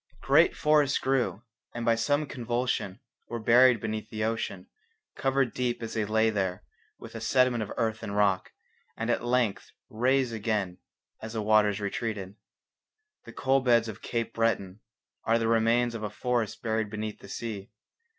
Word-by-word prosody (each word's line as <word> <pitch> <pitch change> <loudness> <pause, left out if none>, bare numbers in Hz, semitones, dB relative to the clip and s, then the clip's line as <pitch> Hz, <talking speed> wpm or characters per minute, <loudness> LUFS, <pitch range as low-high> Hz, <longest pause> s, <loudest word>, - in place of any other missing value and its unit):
Great - - +4
forests 150 -2 +3
grew, 130 -4 0 0.3
and 120 -1 -3
by 115 - +4
some 145 +7 +1
convulsion 120 -6 -2 0.3
were 120 - -4
buried 120 +2 +5
beneath 110 0 -4
the 110 -1 -3
ocean, 110 -4 -2 0.5
covered 135 -2 +1
deep 120 -2 -2
as 115 - -5
they 110 -2 0
lay 110 +1 +2
there 95 - -2 0.3
with - - -11
a 115 - -6
sediment 125 0 +2
of 105 - -4
earth 110 -1 -1
and 100 - -5
rock, 100 -3 +2 0.5
and 115 +1 -1
at 120 - 0
length 120 -4 0 0.2
raised 125 +2 +1
again 105 -4 -2 0.4
as 110 0 -7
the 110 - -2
waters 105 -1 +3
retreated. 100 -2 -3 0.9
The 115 - -11
coal 135 +1 +2
beds 120 -3 +3
of 110 -1 -8
Cape 115 -1 -3
Breton 110 -4 0 0.4
are 115 +1 +3
the 115 -1 0
remains 115 +1 +2
of 115 - -5
a 105 - -3
forest 120 0 -2
buried 110 -2 -1
beneath 105 0 -5
the 100 - -13
sea. 105 -3 -5
115 Hz, 165 wpm, -28 LUFS, 105-120 Hz, 0.9 s, buried